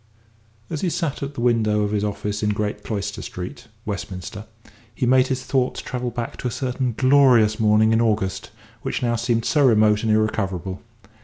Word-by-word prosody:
As 155 - -4
he 185 - +1
sat 160 -3 -2
at 140 +1 -5
the 120 - -4
window 110 -3 +2
of 105 - -1
his 105 -1 0
office 105 0 -3
in 105 - +1
Great 105 0 -2
Cloister 105 -1 -4
Street, 95 +7 -7 0.2
Westminster, 100 +1 -6 0.5
he - - -1
made 130 +1 +4
his 130 -1 -2
thoughts 130 -2 0
travel 125 -1 -4
back 120 0 -5
to - - -3
a - - 0
certain 125 -1 -2
glorious 130 -5 +5
morning 110 0 +4
in 115 - +3
August 105 -4 -1 0.3
which - - -3
now 120 -1 +1
seemed 115 0 0
so 150 - +3
remote 110 -4 +4
and 110 - 0
irrecoverable. 95 -4 -1
110 Hz, 180 wpm, -22 LUFS, 105-125 Hz, 0.5 s, glorious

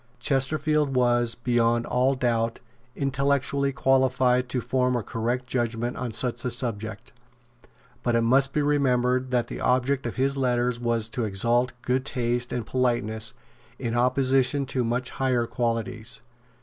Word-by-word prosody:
Chesterfield 140 +2 +1
was, 120 -2 +2
beyond 120 -1 +1
all 130 +2 +2
doubt, 115 -2 0 0.4
intellectually 140 0 0
qualified 130 -1 +2
to 125 - -1
form 125 0 0
a 120 - -1
correct 120 +3 -2
judgment 120 -1 -2
on 125 - -4
such 120 +1 0
a 125 - -1
subject. 110 -3 -5 0.9
But 120 -1 0
it 115 - +3
must 135 +3 +3
be 150 +1 0
remembered 130 -3 +1
that 125 -2 +1
the - - -7
object 130 +1 +1
of 120 - -5
his 135 +1 0
letters 125 -2 +1
was 115 -2 0
to 120 0 -2
exalt 120 +5 +1
good 130 +1 0
taste 120 -2 -2
and 120 -3 -3
politeness 115 -3 -1 0.4
in 120 -3 -3
opposition 130 +2 +2
to 130 -1 -1
much 120 +2 -1
higher 130 -3 0
qualities. 115 -1 -2
125 Hz, 145 wpm, -25 LUFS, 120-130 Hz, 0.9 s, it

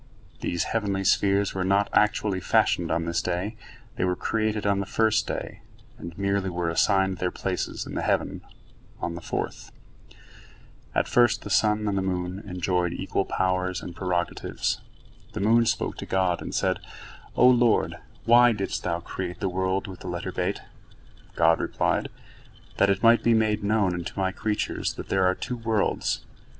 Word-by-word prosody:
These 85 - -1
heavenly 100 -4 0
spheres 100 +1 +2
were 95 - -1
not 100 +2 +2
actually 105 -2 +2
fashioned - - +2
on 85 +1 0
this 85 0 0
day; 90 +5 -2 0.4
they - - 0
were 90 0 +1
created 110 +1 -1
on 100 -1 +2
the 100 - -3
first 110 0 +2
day, - - -5 0.4
and 85 -1 -8
merely 100 -1 0
were 85 -1 -1
assigned 95 +1 +2
their 90 - 0
places 90 0 -3
in - - -8
the - - -2
heavens - - 0 0.6
on 85 - -3
the 85 - -7
fourth. - - -4 1.2
At - - +2
first 120 -1 +3
the 105 - -6
sun 105 +1 +2
and 100 - 0
the 95 - +1
moon 90 0 -2
enjoyed 90 -1 0
equal 95 0 -1
powers 95 0 0
and 85 - -8
prerogatives. 90 -2 -2 0.5
The - - -4
moon 115 +3 +4
spoke 115 - -1
to - - -7
God, 95 -2 +1
and - - -5
said: - - +1 0.6
"O 125 - +6
Lord, 120 -2 +3 0.3
why 120 +1 +6
didst 100 -2 -3
Thou 85 -1 -2
create 90 +1 -5
the 95 - -1
world 95 +1 -1
with 95 -2 -9
the - - -9
letter 85 -1 -4
Bet?" - - -2 0.7
God 80 0 +4
replied: - - 0 0.7
"That 100 - +4
it 100 +2 +1
might 115 0 +6
be 115 -1 +4
made 110 -1 +1
known 100 -3 +2
unto 85 +2 -5
My 95 -1 +1
creatures 105 +1 -2
that - - -8
there 95 -1 +3
are 90 - +2
two 125 +4 -4
worlds." 115 -2 0
95 Hz, 170 wpm, -26 LUFS, 90-105 Hz, 1.2 s, O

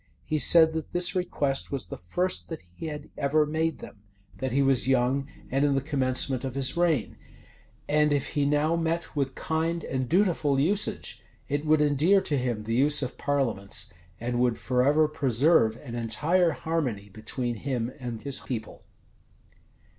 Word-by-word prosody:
He 155 -1 -1
said, 160 +1 +6
that 160 -1 -5
this 175 0 +3
request 145 -7 0
was 140 -3 -2
the - - -7
first 180 - -1
that 160 - -6
he 90 - -9
had 150 -1 -7
ever 150 +2 +2
made 160 +1 -1
them: - - -11 0.4
that 130 +2 -2
he 140 +3 +2
was 135 -2 +2
young, 135 +1 +1 0.2
and 135 +2 +1
in 145 -1 +2
the - - +2
commencement 130 -2 +1
of 130 -1 -4
his 135 +1 0
reign; 170 -8 0 0.7
and 150 0 +2
if 145 -2 0
he 145 - -1
now 150 +3 +2
met 165 0 -2
with 135 -2 -1
kind 165 +1 -2
and 130 -2 -3
dutiful 165 -7 +2
usage, 195 +8 0 0.3
it 145 +1 -2
would 155 0 +4
endear 150 +7 +3
to 155 - -1
him 120 -4 -2
the 115 +1 -3
use 145 +4 +3
of 125 - -6
parliaments, 125 -9 -1 0.3
and 120 +1 -2
would 125 -2 +1
forever 140 +5 +2
preserve 135 -4 +2
an 120 -1 -10
entire 150 +10 +1
harmony 135 -12 -3
between 120 +4 -4
him 125 -1 -3
and 120 -3 -6
his 140 -2 -1
people. 120 -4 -6
140 Hz, 170 wpm, -27 LUFS, 125-160 Hz, 0.7 s, said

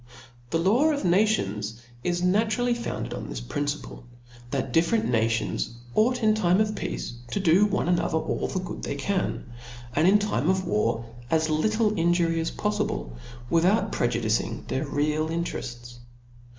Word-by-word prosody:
The 165 - +1
law 205 - +3
of 290 -2 -1
nations 115 - +1 0.2
is 175 0 0
naturally 220 +6 +2
founded 235 0 -4
on - - -6
this - - -4
principle, 145 - -4 0.5
that 135 +1 -2
different 170 +7 +3
nations 115 - 0 0.2
ought 245 - +2
in 215 0 +5
time 185 -3 +3
of 215 0 +1
peace - - -4 0.2
to 200 - -1
do 190 +3 +5
one 200 - -1
another 175 -2 +1
all - - -1
the 185 - -2
good 180 - -6
they - - -3
can, 185 +7 -1 0.5
and 155 +4 +4
in 200 +2 +7
time 190 - 0
of 185 0 +1
war 115 +2 0 0.2
as 160 -1 +2
little 215 +7 +2
injury 170 -1 +2
as 165 - -1
polTible, - - -2 0.4
without 175 - +2
prejudicing 115 -2 0
their 140 +3 -1
real 150 +2 0
interefts. 120 -8 -5
170 Hz, 150 wpm, -26 LUFS, 125-210 Hz, 0.5 s, in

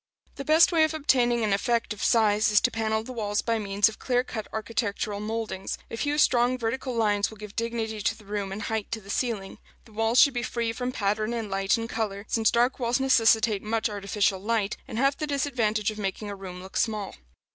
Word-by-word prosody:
The 275 - -7
best 315 +4 +5
way 325 -2 +4
of 315 0 +1
obtaining 245 -5 +2
an 210 -2 +1
effect 230 +2 0
of 210 - -11
size 215 -2 +3
is 210 0 +5
to - - +2
panel 220 -1 -1
the 255 - -8
walls 205 -3 -1
by 230 -1 0
means 200 0 +2
of 220 - -6
clear 250 -1 +1
cut 220 -4 -6
architectural 215 -2 -2
mouldings: 215 -3 -4
a - - -3
few 290 +5 -1
strong 250 -3 +3
vertical 250 +2 -3
lines 205 -3 +2
will 220 - -12
give 210 0 -10
dignity 225 -2 -3
to 225 +2 0
the 215 - -17
room 200 -1 -3
and 205 +2 -5
height 220 -1 -3
to 225 - -2
the 200 -1 -9
ceiling. 215 -6 -2 0.3
The 225 - -18
walls 225 +3 +2
should 280 - +6
be 240 - -1
free 235 -1 -2
from 250 +2 -3
pattern 215 0 -1
and 220 -3 -4
light 195 +3 +1
in 230 0 -4
color, 210 -3 -3
since 225 -1 +2
dark 245 +3 +2
walls 240 +1 +1
necessitate 225 -5 +3
much 220 0 -1
artificial 200 -1 0
light, 210 0 -1
and - - -6
have 275 +3 +2
the 305 - -3
disadvantage 235 -7 0
of 215 - -9
making 205 +1 -3
a - - -5
room 185 -2 -8
look 190 - -7
small. 215 -3 -1
220 Hz, 220 wpm, -26 LUFS, 205-240 Hz, 0.3 s, should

